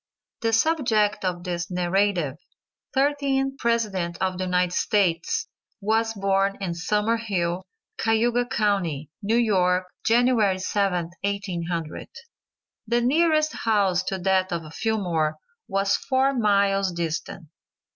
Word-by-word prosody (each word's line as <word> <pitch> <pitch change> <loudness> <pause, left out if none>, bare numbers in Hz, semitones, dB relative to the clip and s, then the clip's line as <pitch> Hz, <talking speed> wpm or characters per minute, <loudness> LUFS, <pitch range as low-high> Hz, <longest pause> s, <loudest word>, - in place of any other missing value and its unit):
The 225 -1 +1
subject 225 -6 +2
of 180 -2 -2
this 175 -1 -3
narrative, 180 -4 0 0.6
thirteenth 270 -1 +1
president 205 -8 0
of 185 -1 -1
the 185 - -1
United 180 -1 +1
States, 200 - +1 0.3
was 225 +2 0
born 195 0 +1
in 185 -4 -2
Summer 210 +6 0
Hill, 185 -6 -1 0.4
Cayuga 235 +2 +2
county, 180 - -1
New 215 +3 +1
York, 185 -5 +2 0.2
January 230 -4 +3
7th, 185 -3 -1
1800. 175 -5 -3 0.8
The 235 +2 +2
nearest 310 +4 +2
house 200 -5 +1
to 190 - -2
that 190 0 +1
of 165 -2 -4
Fillmore 175 -9 -1 0.3
was 195 +1 +1
four 270 +1 +1
miles 200 -4 +2
distant. 165 -1 -4
195 Hz, 115 wpm, -24 LUFS, 180-230 Hz, 0.8 s, January